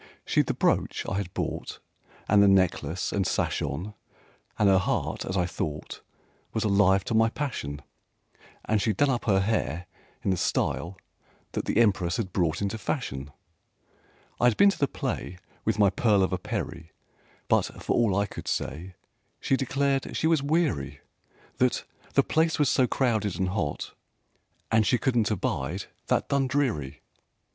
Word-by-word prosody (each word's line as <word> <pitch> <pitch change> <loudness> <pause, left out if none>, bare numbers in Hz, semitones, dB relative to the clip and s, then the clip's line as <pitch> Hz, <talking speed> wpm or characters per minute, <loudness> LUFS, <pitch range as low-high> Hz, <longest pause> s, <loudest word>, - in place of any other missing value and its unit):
She'd - - +2
the - - -1
brooch - - +1
I 95 - -1
had 100 -3 -3
bought - - -3 0.5
And 105 0 +5
the 100 - +6
necklace 95 -3 +2
and 100 -2 0
sash - - 0
on, 105 +5 -4 0.6
And 105 - +3
her 95 -1 +5
heart, - - -1
as 95 - -2
I 90 - +2
thought, 75 -3 -5 0.5
Was 110 - 0
alive 100 -2 +4
to 115 - -3
my 115 0 +4
passion; 75 - -4 0.8
And 110 -1 +1
she'd 105 -3 0
done 145 -1 +3
up 120 - -2
her 95 -3 +3
hair 90 -6 -1 0.4
in 95 - +1
the 95 - +1
style 85 +2 -1 0.5
that - - -3
the - - -1
Empress 100 -5 +3
had 95 -6 -3
brought 85 0 0
into 100 +3 -2
fashion. 75 - -3 1.1
I - - +3
had 120 -3 +4
been 200 0 +7
to - - -8
the 140 - +3
play 90 - -4 0.3
With 110 -1 +1
my 100 -3 +5
pearl 105 -4 +3
of 95 - 0
a 95 - -1
Peri 85 -6 -5 0.6
But, - - +3 0.2
for - - 0
all 110 -6 +3
I 100 +1 +2
could - - -9
say, 90 +4 -3 0.4
She 135 - +1
declared 135 +1 0
she - - 0
was 160 -3 +3
weary, 140 - 0 0.6
That - - +1 0.3
"the - - +5
place 160 0 +1
was 145 -3 +3
so 130 - +3
crowded 110 -9 0
and 95 0 0
hot, 90 -7 -3 0.8
and 110 -1 +5
she 125 - +2
couldn't 120 -3 +1
abide 95 - -2 0.2
that - - +1
Dundreary." 130 - 0
100 Hz, 165 wpm, -27 LUFS, 90-120 Hz, 1.1 s, been